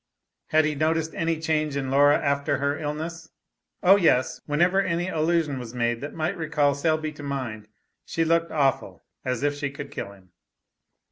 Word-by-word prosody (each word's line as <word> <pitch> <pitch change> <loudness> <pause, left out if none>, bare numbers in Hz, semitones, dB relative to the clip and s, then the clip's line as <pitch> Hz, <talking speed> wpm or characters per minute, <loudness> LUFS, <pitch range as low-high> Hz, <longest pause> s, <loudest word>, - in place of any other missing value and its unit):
Had 155 0 +3
he 155 - 0
noticed 160 +2 0
any 165 -1 -1
change 155 -2 0
in 135 -1 -2
Laura 145 +1 +5
after 140 -1 0
her 140 +1 0
illness? 160 +2 -5 0.5
Oh, 195 +2 +7
yes. 125 -8 +2
Whenever, 175 +6 +3
any 175 -1 -1
allusion 160 -4 0
was 120 -1 -8
made 120 -1 0
that 145 - -6
might 165 +4 -1
recall 150 -4 +1
Selby 155 +1 0
to 150 - -12
mind, 130 -7 -4 0.4
she 165 - -1
looked 165 +1 +2
awful 140 -4 0 0.2
as 125 +1 -2
if 145 0 +2
she 145 0 -3
could 140 +1 -8
kill 100 - -5
him. 95 -2 -21
150 Hz, 175 wpm, -25 LUFS, 140-160 Hz, 0.5 s, Oh